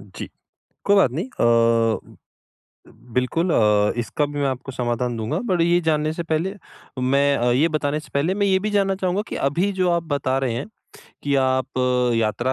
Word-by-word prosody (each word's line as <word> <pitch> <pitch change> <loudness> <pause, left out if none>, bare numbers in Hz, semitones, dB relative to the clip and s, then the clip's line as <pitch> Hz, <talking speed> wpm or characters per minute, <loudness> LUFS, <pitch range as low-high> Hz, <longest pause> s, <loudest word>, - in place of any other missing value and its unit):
जी। - - -9 0.6
कोई 200 - +4
बात 195 -10 +4
नहीं 170 - -3
अ, 115 - +1 1.0
बिल्कुल 165 +8 0
अ, 105 -3 +3
इसका 135 +5 -1
भी 145 0 -6
मैं 140 - +1
आपको 130 +1 -5
समाधान 120 -1 -2
दूँगा, 110 0 -2
बट 185 -7 0
ये 175 +1 +3
जानने 155 0 +1
से 170 - -4
पहले 165 +4 -2 0.4
मैं 140 +2 +2
अ, 120 +1 +1
ये 145 +7 +3
बताने 155 -1 -1
से 155 - -16
पहले 160 +7 +1
मैं 205 0 +1
ये 190 -1 +3
भी 210 +3 -3
जानना 195 -1 +1
चाहूँगा 185 +1 -1
कि - - -5
अभी 180 +7 0
जो 180 -1 +3
आप 170 -1 +1
बता 130 -1 0
रहे 130 -4 -1
हैं, 120 - -4 0.6
कि 140 -1 0
आप 130 0 -1 0.4
यात्रा 115 +3 0
140 Hz, 185 wpm, -22 LUFS, 125-175 Hz, 1.0 s, कोई